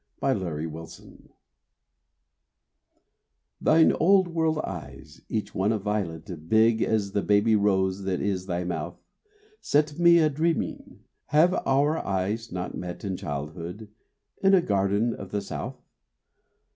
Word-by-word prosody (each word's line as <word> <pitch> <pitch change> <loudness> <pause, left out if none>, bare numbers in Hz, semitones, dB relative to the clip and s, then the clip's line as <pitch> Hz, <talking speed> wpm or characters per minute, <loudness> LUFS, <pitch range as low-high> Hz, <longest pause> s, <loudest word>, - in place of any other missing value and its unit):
ON 135 -1 +1
A - - -3
MINIATURE 80 -2 -7 2.3
Thine 160 +1 +5
old 185 +2 +3
world 160 -2 0
eyes 75 -3 -8
each 110 -2 -3
one 100 +3 +1
a 110 - +1
violet 90 -5 -4
Big 110 +1 +4
as 105 -3 0
the 100 - 0
baby 105 +2 +3
rose 95 -2 +1
that 95 -2 -1
is 95 -2 -2
thy 90 -1 -2
mouth 85 0 -4 0.6
Set 150 +1 0
me 170 0 +7
a 160 -2 +4
dreaming. 160 +3 -2 0.3
Have 160 +5 +4
our 145 +4 +2
eyes 100 +4 -2
not 90 0 -4
met 90 -1 -6
In 95 -2 -2
childhood 85 +8 -6 0.5
in 195 0 +5
a 185 - +4
garden 100 +3 +1
of 95 -3 -8
the 105 - -2
South? - - -6
100 Hz, 135 wpm, -26 LUFS, 90-135 Hz, 2.3 s, me